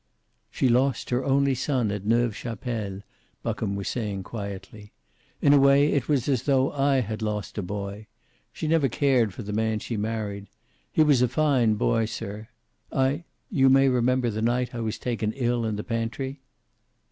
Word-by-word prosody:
"She 130 - +1
lost 130 +2 +1
her 125 +1 +1
only 140 0 +2
son 130 -4 0
at 105 0 -5
Neuve 115 -1 +2
Chapelle," 110 -4 -4 0.4
Buckham 100 - -2
was 100 -1 -4
saying 105 -5 -3
quietly. 105 0 -8 0.5
"In 140 - +6
a 145 - +6
way, 140 +2 +5
it 140 -2 -1
was 135 -5 +1
as 130 -5 +1
tho 135 -1 +2
I 135 -1 +2
had 110 -1 -4
lost 105 -1 -3
a - - 0
boy. 100 +2 -5 0.4
She 155 - -4
never 155 -4 +3
cared 125 -4 +2
for 115 - -8
the 105 +1 -5
man 110 0 0
she 110 +1 -4
married. 105 -2 -3 0.4
He 155 - +4
was 145 -5 +4
a 125 - +4
fine 130 -5 +2
boy, 115 +2 +1
sir. 105 0 -6 0.4
I 135 +5 0 0.3
you 135 -8 +4
may 135 0 +5
remember 125 -1 +2
the 110 +1 -3
night 125 +2 0
I 120 - -4
was 110 -2 -2
taken 115 -3 -2
ill 120 -3 0
in 110 -1 -1
the 105 - -4
pantry." 125 +4 -3
120 Hz, 180 wpm, -26 LUFS, 105-135 Hz, 0.5 s, In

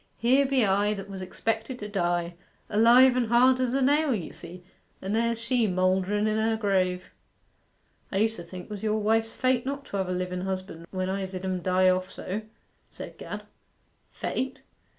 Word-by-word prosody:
Here 265 +4 +3
be 265 -4 +3
I, 205 +2 +2
that 200 0 -8
was 190 -1 -6
expected 225 +6 -3
to 210 - -6
die, 175 -3 -1 0.4
alive 240 +4 +6
and 245 -2 +1
hard 250 +3 +5
as 255 0 0
a 270 - +2
nail, 290 0 +3
you 175 -7 -6
see, 175 +2 -10 0.4
and 195 +3 -2
there's 230 0 +1
she 230 0 +1
moulderen 185 +2 +1
in 215 0 +1
her 220 0 +1
grave.' 185 -3 0 1.0
'I 195 - -1
used 220 +2 +2
to 175 - -7
think 180 +1 -9
'twas 205 -2 -6
your 215 0 0
wife's 225 +1 +1
fate 255 -2 +1
not 275 +1 -4
to 200 - -5
have 190 -2 -1
a - - 0
liven 180 0 -3
husband 185 -3 -5
when 185 -1 -3
I 195 +1 -2
zid 185 0 -6
'em 185 -1 -2
die 185 +1 +3
off 185 0 0
so,' 200 +4 -5 0.5
said - - -10
Gad. - - -6 0.7
'Fate? 260 0 -4
205 Hz, 190 wpm, -27 LUFS, 185-235 Hz, 1.0 s, alive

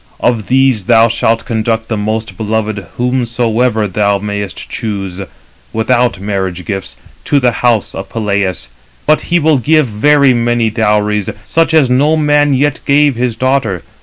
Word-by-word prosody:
Of 115 -4 0
these 130 -6 +2
thou 115 +1 +4
shalt 115 0 0
conduct 115 0 -1
the 110 - -2
most 110 -1 -3
beloved 110 -2 -3
whomsoever 120 -2 0
thou 100 +1 +1
mayest 105 0 -5
choose, 100 -5 -5 0.5
without 120 -1 +1
marriage 95 -3 -3
gifts, 95 -2 -5 0.3
to 145 - +2
the 125 -2 +2
house 115 -2 0
of 95 - -7
Peleus; 100 - -2 0.4
but 155 0 +3
he 175 - +3
will 155 -3 +2
give 155 +4 +3
very 135 +5 +3
many 120 -1 0
dowries, 105 -2 0 0.2
such 165 0 +1
as 150 -4 +5
no 145 +5 +3
man 145 -2 +2
yet 145 +2 0
gave 145 -1 +3
his 120 -1 -1
daughter. 125 -7 -1
115 Hz, 150 wpm, -13 LUFS, 105-130 Hz, 0.5 s, as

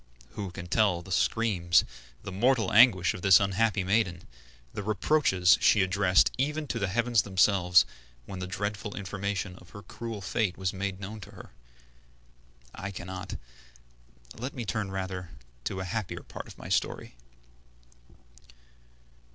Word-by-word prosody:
Who 100 +7 -5
can 90 0 -8
tell 90 -2 +1
the 95 - -11
screams, 90 -4 +2 0.4
the - - -6
mortal 115 +1 +1
anguish 105 -6 +6
of - - -8
this 95 -1 +7
unhappy 100 0 +1
maiden, 95 -3 0 0.5
the - - -4
reproaches 100 - +3
she 105 - +5
addressed 95 0 +3
even 150 +3 -1
to 115 - -2
the 100 - 0
heavens 120 +2 +2
themselves, 95 -2 +4 0.4
when 95 +5 -7
the 90 - -4
dreadful 105 +2 -4
information 100 -1 -4
of 90 - -17
her 100 - -11
cruel 115 -2 -7
fate 100 -1 -1
was 95 -1 -2
made 95 0 -4
known 105 +2 -7
to - - -12
her? - - -12 1.2
I 95 - -6
cannot; 95 0 -7 1.0
let 130 +4 -6
me 120 -3 -4
rather 95 -3 -3
turn 70 - -16 0.3
to 95 -1 -3
a - - -4
happier 105 +1 -4
part - - -9
of - - -13
my - - -9
story. - - -1
100 Hz, 145 wpm, -28 LUFS, 95-110 Hz, 1.2 s, this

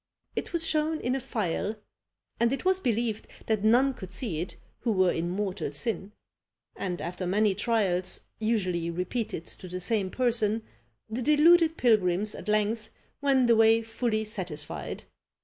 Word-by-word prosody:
It - - -3
was 335 -2 +2
shown 310 0 +1
in 245 - -1
a 270 - 0
phial, 215 -4 -2 0.6
and 235 0 +3
it 275 - -3
was 375 0 +3
believed 230 - -1 0.2
that 215 -2 0
none 250 +5 +4
could 190 -7 -9
see 185 -5 -2
it 180 - -5 0.2
who 235 - 0
were 185 -3 +3
in 170 +1 -2
mortal 190 -4 -2
sin; 210 - -2 0.6
and 180 -2 -3
after 175 +4 -4
many 205 +2 +3
trials 195 -4 0 0.2
usually 185 -7 0
repeated 180 +1 -3
to 185 - -9
the 180 +1 -5
same 195 +1 0
person, 225 -2 +1 0.4
the 225 +3 -3
deluded 320 +4 +5
pilgrims 210 -3 +2
at - - -9
length 215 +1 0 0.3
went 270 -3 +3
away 225 0 +5
fully 225 -1 -1
satisfied. 180 -9 -5
215 Hz, 150 wpm, -28 LUFS, 185-240 Hz, 0.6 s, deluded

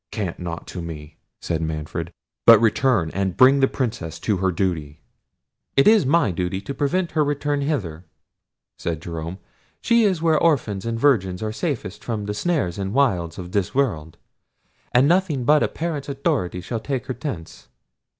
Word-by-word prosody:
"Cant 100 -6 -4
not 85 -1 -5
to 90 - -7
me," 75 -2 -8 0.2
said 80 -1 -2
Manfred, 80 +1 -4 0.4
"but 115 -2 +10
return 115 -6 +2
and 95 -1 -2
bring 135 +2 +6
the 135 - +4
Princess 100 - -3
to 105 -3 0
her 95 +1 +1
duty." 80 -5 -2 0.8
"It 135 - +6
is 215 -9 +5
my 155 - +3
duty 90 +2 -2
to 100 +8 -6
prevent 170 +6 0
her 155 - +2
return 145 0 -1
hither," 95 - -3 0.7
said 85 -2 -3
Jerome. 85 +1 -6 0.4
"She 235 -1 +3
is 190 -5 +2
where 160 -2 +3
orphans 115 - +1
and 115 0 -2
virgins 105 -9 +2
are 110 - -2
safest 110 - -4
from 110 -3 -3
the 105 - -3
snares 105 - -1
and 100 +3 -3
wiles 90 -12 +1
of 90 -1 -7
this 100 +3 -1
world; 85 - -1 0.7
and 125 +3 +4
nothing 170 -6 +2
but 150 +4 +4
a - - +3
parent's 155 -4 -4
authority 135 - -1
shall 115 +5 -4
take 130 0 -3
her 130 - -3
thence." 115 - -7
110 Hz, 170 wpm, -22 LUFS, 90-140 Hz, 0.8 s, but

